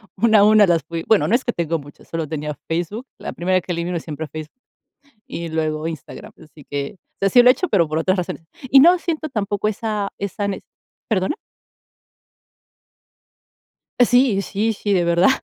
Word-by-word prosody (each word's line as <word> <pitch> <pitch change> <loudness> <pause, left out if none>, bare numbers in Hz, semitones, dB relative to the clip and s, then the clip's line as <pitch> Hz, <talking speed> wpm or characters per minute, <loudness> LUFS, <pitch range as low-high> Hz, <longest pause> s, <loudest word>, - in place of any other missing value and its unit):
una 220 -2 +4
a - - +6
una 215 -1 +6
las 170 -2 +2
fui 165 -1 -5
bueno, 220 -2 +4
no 235 - +3
es 255 - 0
que 240 - 0
tengo 165 -1 -1
muchas, 145 -1 -14
solo 165 -1 -3
tenía 150 -1 -4
Facebook, 175 +9 -3
la - - -6
primera 185 +1 +1
que 180 - -6
elimino 170 0 -2
siempre 155 0 -6
es - - -16
Facebook, 155 +10 -9 0.7
y 170 0 -5
luego 155 -1 -2
Instagram, 160 -3 -8
así 155 -2 -16
que, 145 +6 -4
o - - -54
sea, 195 - +3
sí 245 - +7
lo 250 - +6
he - - +8
hecho, 360 +8 -3
pero 175 -5 +3
por 155 +1 -1
otras 185 +4 +1
razones. 175 -2 -4 0.3
Y 270 +1 +7
no 350 +4 +6
siento 315 -2 -3
tampoco 210 -3 -1
esa 210 -1 -2
esa 200 +1 -3
nece 195 - -5 0.4
¿Perdona? 195 - 0 2.6
Sí, 245 -4 +4
sí, 215 +3 -1
sí, 205 0 -3
de 175 -2 +2
verdad. 170 +7 +4
185 Hz, 190 wpm, -21 LUFS, 165-220 Hz, 2.6 s, he